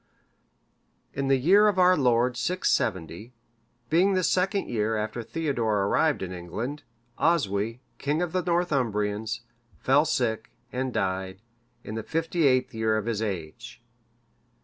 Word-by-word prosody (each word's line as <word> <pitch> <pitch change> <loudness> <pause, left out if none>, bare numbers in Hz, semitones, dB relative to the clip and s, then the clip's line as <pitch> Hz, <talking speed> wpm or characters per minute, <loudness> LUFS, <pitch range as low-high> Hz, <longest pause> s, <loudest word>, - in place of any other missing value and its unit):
] - - -45 0.3
In 140 0 -2
the 135 0 +4
year 195 +11 +5
of 205 -2 +1
our 185 0 +6
Lord 125 -3 +2
670,(561) 115 - -1 0.6
being 185 +5 +4
the 185 - +1
second 190 +3 +1
year 110 -1 -1
after 110 +2 -3
Theodore 115 -7 -1
arrived 150 +4 +1
in 90 - -5
England, 105 - -5 0.4
Oswy, 115 - +1 0.2
king 145 +3 0
of 175 -2 -1
the 185 - 0
Northumbrians, 115 - -1 0.4
fell 140 - +3
sick, 115 -7 -1 0.2
and 130 +1 -2
died, 95 -2 -2 0.4
in - - -7
the 110 - -3
fifty 165 +4 0
eighth 130 0 +2
year 110 -1 +1
of 110 - -3
his 115 -2 -2
age. 100 +4 -5
120 Hz, 140 wpm, -26 LUFS, 105-160 Hz, 0.6 s, our